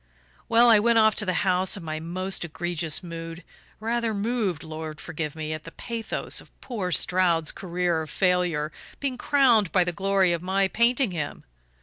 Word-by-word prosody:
"Well, 235 +1 +6
I 225 -3 +7
went 230 +2 +3
off 220 -1 +5
to 210 - +3
the 185 - +1
house 185 +1 +2
in 190 - -9
my 155 -1 -4
most 185 +4 -3
egregious 175 0 -1
mood 165 0 -7 0.4
rather 230 0 -1
moved, 205 -6 -1
Lord 155 -1 -7
forgive 150 -2 -5
me, 155 0 -4
at 155 0 -6
the 165 - -9
pathos 230 +2 -4
of - - -18
poor 205 -8 -4
Stroud's 170 -2 +2
career 175 -2 -1
of 155 - -7
failure 180 -5 +1 0.3
being 275 -2 -2
crowned 245 - +3
by 185 - +4
the 175 - -2
glory 195 0 +2
of 170 - -2
my 190 +2 +1
painting 235 +2 +2
him! 155 -5 -4
180 Hz, 180 wpm, -25 LUFS, 165-215 Hz, 0.4 s, I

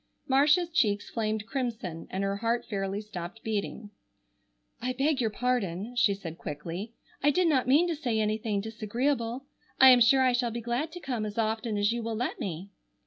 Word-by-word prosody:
Marcia's 295 +6 +4
cheeks 205 -11 +1
flamed 215 -2 -1
crimson 225 - -4
and 190 +1 -2
her 195 0 -1
heart 230 +2 0
fairly 195 -1 -3
stopped 200 0 -8
beating. 215 0 -3 0.9
"I 255 +1 -1
beg 270 +1 +1
your 225 - +1
pardon," 220 -2 -2
she 240 -5 +3
said 170 -4 -8
quickly, 170 +9 -6 0.3
"I 290 - +4
did 355 +4 +3
not 265 -6 +2
mean 300 +7 +5
to 340 - -1
say 245 -7 -1
anything 215 -1 0
disagreeable. 230 +4 -2 0.3
I 265 - +10
am 250 -1 +6
sure 260 +3 +6
I 255 -1 +3
shall 245 -1 +1
be 235 +1 -4
glad 240 +7 -2
to 355 - -7
come 250 -9 -3
as 210 0 -5
often 220 0 -1
as 205 +1 +2
you 235 0 -2
will 225 0 -3
let 245 +4 -2
me." 185 +2 -5
230 Hz, 190 wpm, -28 LUFS, 205-255 Hz, 0.9 s, I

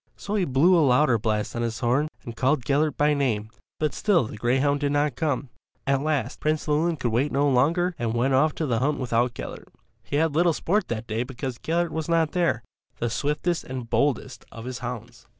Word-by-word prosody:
So 205 - -6
he 200 -4 +2
blew 160 +6 +4
a 170 - +5
louder 130 -3 +4
blast 105 0 -1
on 120 - -2
his 115 -1 -2
horn 125 +6 +1 0.2
and 115 - -7
called 130 +1 +1
Gellert 150 +2 +1
by 150 0 +3
name, 115 -7 -1 0.3
but 155 -1 0
still 200 -9 +2
the 110 - -7
greyhound 130 +6 +1
did 145 0 0
not 145 -2 +1
come. 145 -4 -1 0.4
At 135 -1 +2
last 145 -4 -1
Prince 155 0 -1
Llewelyn 160 +2 +1
could 120 -4 -1
wait 130 +6 +1
no 140 +2 +2
longer 165 +8 +2
and 115 -1 -1
went 130 +3 +1
off 150 +4 +3
to 160 - -2
the 120 -5 0
hunt 145 +4 +1
without 120 -1 0
Gellert. - - -8 0.3
He - - -5
had 160 0 +2
little 170 +1 +4
sport 190 +5 0
that 110 -1 -4
day 110 0 -2
because 125 0 -5
Gellert 170 +1 0
was 160 0 -3
not 165 -2 +2
there, 170 -9 +1 0.3
the 120 -1 -2
swiftest 150 +6 -1
and 125 -3 -7
boldest 125 +1 0
of 115 0 -9
his 130 -1 -5
hounds. 120 -1 -7
140 Hz, 215 wpm, -25 LUFS, 120-155 Hz, 0.4 s, a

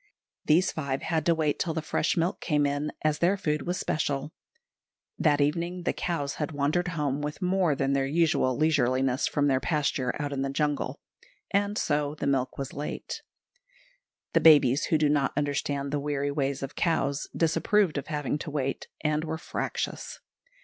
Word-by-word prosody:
These 175 +5 +4
five 140 -3 -3
had 160 -3 -1
to 170 - +4
wait 155 -2 0
till 165 -3 -1
the 160 - -1
fresh 155 +3 0
milk 170 +2 0
came 150 -3 +2
in, 145 +1 -1
as 155 -1 +1
their 185 +4 +3
food 150 -5 -1
was 180 +1 0
special; 145 0 -1 0.9
that 150 -3 +3
evening 170 +5 0
the - - 0
cows 145 -5 -2
had 150 +1 -2
wandered 150 +5 +1
home 145 -1 0
with 150 +1 -4
more 180 -4 +2
than 135 0 0
their 135 -1 +1
usual 150 -4 +2
leisureliness 135 -3 +2
from 145 -1 +1
their 135 -2 +3
pasture 140 -4 -1
out 145 -1 -2
in 135 - -2
the 135 - -1
jungle, 145 -1 -1 0.5
and 205 +1 +1
so 145 -1 0
the 150 - -4
milk 135 -2 0
was 135 -1 -5
late. 145 +1 -5 1.1
The - - +4
babies, 145 -4 +6
who 160 - +2
do 150 0 +3
not 145 -2 +1
understand 140 -1 -1
the 145 - 0
weary 145 0 -1
ways 140 -1 -1
of 135 - -5
cows, 155 -4 0
disapproved 165 0 +2
of - - -9
having 150 -1 -2
to 155 - -5
wait, 135 -2 -2
and 150 0 0
were 160 0 -3
fractious. - - -4
150 Hz, 175 wpm, -28 LUFS, 140-160 Hz, 1.1 s, babies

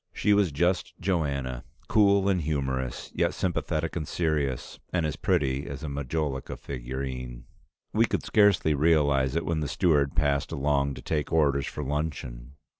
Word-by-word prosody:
She 105 - +2
was 100 -5 +3
just 85 +6 0
Joanna, 70 -9 -1 0.2
cool 100 -2 +4
and 95 -3 +2
humorous, 65 -5 -2
yet - - 0
sympathetic 80 -3 -1
and 80 -4 -3
serious, 75 -6 -1
and 85 -3 +1
as 75 0 -2
pretty 70 -6 0
as 70 +2 -6
a - - -3
Majolica 70 0 -3
figurine. 65 -1 -6 0.5
We 115 +2 +4
could - - -1
scarcely 100 -7 +4
realize 70 -3 +3
it 85 - 0
when 80 -2 0
the 75 - -2
steward 75 -7 +2
passed 70 -2 +1
along 70 -1 0
to - - -10
take 75 -2 -2
orders 70 -4 +2
for 75 - -5
luncheon. 70 -3 -4
75 Hz, 155 wpm, -27 LUFS, 70-85 Hz, 0.5 s, cool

